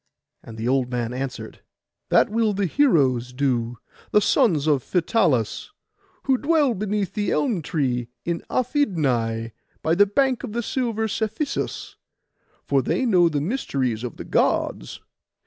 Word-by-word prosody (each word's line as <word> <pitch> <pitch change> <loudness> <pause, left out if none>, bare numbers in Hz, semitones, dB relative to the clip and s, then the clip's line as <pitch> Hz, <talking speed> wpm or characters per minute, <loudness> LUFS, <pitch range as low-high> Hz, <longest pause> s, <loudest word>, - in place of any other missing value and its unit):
And 115 -1 -11
the 110 +2 -3
old 130 -1 +1
man 120 -1 -2
answered— 130 +1 -6 0.5
'That - - +4
will 220 -1 +1
the 200 0 0
heroes 140 - +2
do, 125 -3 -1 0.3
the - - +4
sons 155 -6 +2
of 145 -4 +2
Phytalus, 165 - 0 0.5
who 265 -2 +2
dwell 295 -4 +2
beneath 205 -2 -2
the 205 -3 -1
elm 230 - 0
tree 130 -7 -1 0.2
in 170 0 -2
Aphidnai, 135 - 0 0.3
by 160 - +2
the 205 +4 +5
bank 260 +5 +1
of 235 -1 -3
silver 230 -4 -1
Cephisus; 220 +7 -3 0.7
for 140 -1 +2
they 260 - 0
know 180 -7 +4
the 145 -3 -1
mysteries 135 - -2
of 125 - -6
the - - -7
Gods. - - 0
170 Hz, 140 wpm, -23 LUFS, -, 0.7 s, the